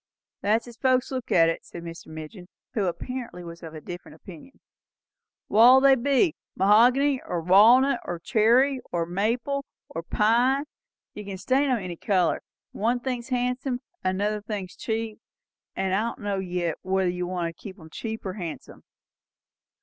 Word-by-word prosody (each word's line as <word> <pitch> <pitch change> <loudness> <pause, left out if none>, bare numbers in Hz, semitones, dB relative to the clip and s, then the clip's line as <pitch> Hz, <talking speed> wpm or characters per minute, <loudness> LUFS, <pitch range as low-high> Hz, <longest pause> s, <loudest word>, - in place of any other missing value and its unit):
"That's 220 +4 +1
as 235 -1 -12
folks 255 -1 +2
looks 255 -3 -4
at 165 -2 +5
it," 165 - -2
said 170 - -10
Mr. 170 0 -9
Midgin, 160 +4 -9 0.3
who 210 -6 0
apparently 230 +2 -5
was 170 0 -10
of 160 -2 -9
a 155 - -8
different 175 -2 -9
opinion. 175 - -13 0.9
"What'll 240 +5 +7
they 275 0 +6
be? 280 +6 +2 0.2
Mahogany, 245 +8 +4
or 175 - -3
walnut, 225 +11 +6
or 175 - -4
cherry, 240 +8 +3
or 170 -1 0
maple, 230 +10 -1 0.3
or 165 - -5
pine? 240 - +2 0.5
You 210 - -7
kin 195 -1 -6
stain 270 +8 +1
'em 255 - +2
any 180 -5 -6
colour. 185 -4 +1 0.3
One 235 +4 0
thing's 245 -1 -4
handsome, 250 0 -1 0.2
and 185 0 0
another 210 +1 0
thing's 205 -3 -6
cheap; 225 -1 -3 0.6
and 190 -1 -1
I 210 +4 +1
don' - - -14
know 200 -1 -1
yet 175 -3 -2
whether 190 -1 +1
you 180 0 -3
want 175 -2 -3
'em 185 -6 -10
cheap 220 +3 -6
or 190 - -3
handsome." 170 -8 -7
210 Hz, 160 wpm, -26 LUFS, 180-250 Hz, 0.9 s, What'll